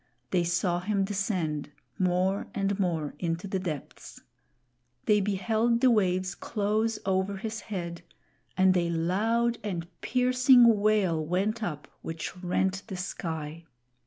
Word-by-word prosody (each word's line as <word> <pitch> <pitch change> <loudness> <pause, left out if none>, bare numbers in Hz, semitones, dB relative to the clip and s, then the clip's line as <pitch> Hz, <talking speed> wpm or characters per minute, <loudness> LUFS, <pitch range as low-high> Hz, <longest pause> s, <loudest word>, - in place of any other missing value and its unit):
They 180 -2 +2
saw 175 +1 +1
him 195 +2 0
descend, 185 -8 -2 0.3
more 185 +1 +1
and 200 0 0
more, 165 -6 -1
into 170 +2 -2
the 190 0 -1
depths. 160 -7 -6 0.9
They 210 -1 +4
beheld 220 +4 +1
the 255 0 +5
waves 185 -3 +1
close 215 +2 -1
over 190 +1 0
his 220 +2 -4
head, 175 -5 -5 0.6
and 185 0 +5
a 170 -1 +1
loud 220 +8 +1
and 180 -5 -3 0.2
piercing 250 -3 +5
wail 200 -6 +2
went 195 +8 -1
up 155 -8 -4
which 165 +2 -5
rent 190 +2 0
the 190 -4 -5
sky. 165 -3 -5
190 Hz, 130 wpm, -28 LUFS, 175-215 Hz, 0.9 s, the